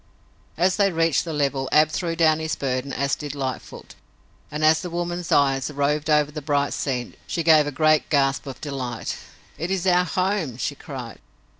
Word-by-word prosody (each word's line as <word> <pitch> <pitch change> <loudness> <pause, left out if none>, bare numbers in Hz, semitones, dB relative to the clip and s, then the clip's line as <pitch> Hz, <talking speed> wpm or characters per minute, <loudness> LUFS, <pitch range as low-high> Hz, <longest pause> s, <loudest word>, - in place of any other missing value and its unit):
As 180 +3 +2
they 200 -2 +3
reached 165 -3 +1
the 165 - -4
level 140 -3 -1
Ab 155 0 +5
threw 165 0 -2
down 160 -2 +3
his 160 -1 -2
burden, 130 0 -2
as 140 +1 -1
did 145 -1 -4
Lightfoot, 130 -3 -6 0.6
and 150 +1 -1
as 155 0 +5
the 180 - -5
woman's 175 0 -3
eyes 135 -1 +3
roved 150 +1 -1
over 150 -1 +3
the 150 0 -6
bright 145 -1 0
scene, 125 -3 -3
she 165 - -2
gave 155 -2 +5
a - - -2
great 155 +1 +2
gasp 135 -2 +1
of 135 - -7
delight. 130 -6 -4 0.4
"It 165 - -3
is 190 -1 -1
our 180 -1 +4
home!" 180 - -1
she 145 - -2
cried. 130 -5 -8
150 Hz, 185 wpm, -23 LUFS, 140-165 Hz, 0.6 s, Ab